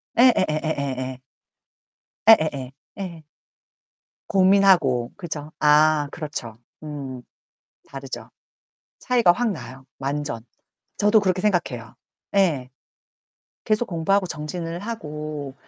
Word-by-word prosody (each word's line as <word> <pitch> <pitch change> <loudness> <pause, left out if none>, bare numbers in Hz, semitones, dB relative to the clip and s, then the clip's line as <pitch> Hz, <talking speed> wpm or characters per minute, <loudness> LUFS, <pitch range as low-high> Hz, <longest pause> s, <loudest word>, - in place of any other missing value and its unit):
예예예예예예. 140 - +2 1.1
예예예. 155 - +5 0.3
예. 170 -5 -6 1.0
고민하고 185 - +4
그죠? 155 -5 -6
아 150 0 +4
그렇죠. 145 -8 -6 0.3
음. 135 -4 -6 0.7
다르죠. 135 -1 -7 0.7
차이가 240 -8 +4
확 235 +3 0
나요, 130 - -8
완전. 140 -4 -3 0.5
저도 210 +1 +4
그렇게 185 -2 +1
생각해요. 130 - -1 0.4
예. 145 -10 +2 0.9
계속 215 +2 +1
공부하고 185 +3 +1
정진을 165 +2 -5
하고 150 - -6
155 Hz, 205 characters per minute, -23 LUFS, 135-190 Hz, 1.1 s, 예예예